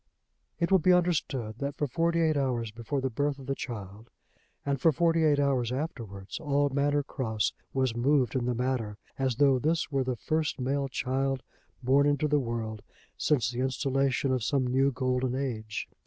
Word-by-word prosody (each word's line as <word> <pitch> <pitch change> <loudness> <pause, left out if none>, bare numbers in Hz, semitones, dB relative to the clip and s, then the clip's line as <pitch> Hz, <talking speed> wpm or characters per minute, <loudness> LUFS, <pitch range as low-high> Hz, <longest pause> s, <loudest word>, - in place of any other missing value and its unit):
It 170 +1 0
will 190 - +6
be 180 +3 +4
understood 140 -10 0
that 140 0 -3
for 150 - 0
forty 170 +4 +1
eight 160 -1 +3
hours 125 -5 0
before 115 +5 -3
the 130 0 -1
birth 145 +4 0
of 135 - -10
the 135 - -1
child 110 -3 -7 0.6
and 140 -2 -1
for 165 - +5
forty 165 +2 +2
eight 150 -2 +4
hours 130 -4 +1
afterwards 115 - -5
all 145 -1 +1
Manor 145 +1 +1
Cross 110 -6 -1 0.2
was 130 -3 0
moved 130 -1 +2
in 125 -2 0
the 125 0 0
matter, 120 -4 -1 0.2
as 130 -3 +1
though 135 0 +4
this 155 +3 0
were 135 -2 +1
the 130 -1 -2
first 155 +4 -1
male 135 +2 0
child 135 +1 -1 0.4
born 140 +3 +4
into 145 +1 +2
the 150 0 +3
world 115 -4 -3 0.3
since 125 -6 +1
the 120 - -5
installation 135 0 +1
of 130 -3 0
some 135 +1 +1
new 135 +2 +2
golden 130 0 0
age. 110 -6 -3
135 Hz, 185 wpm, -29 LUFS, 120-145 Hz, 0.6 s, will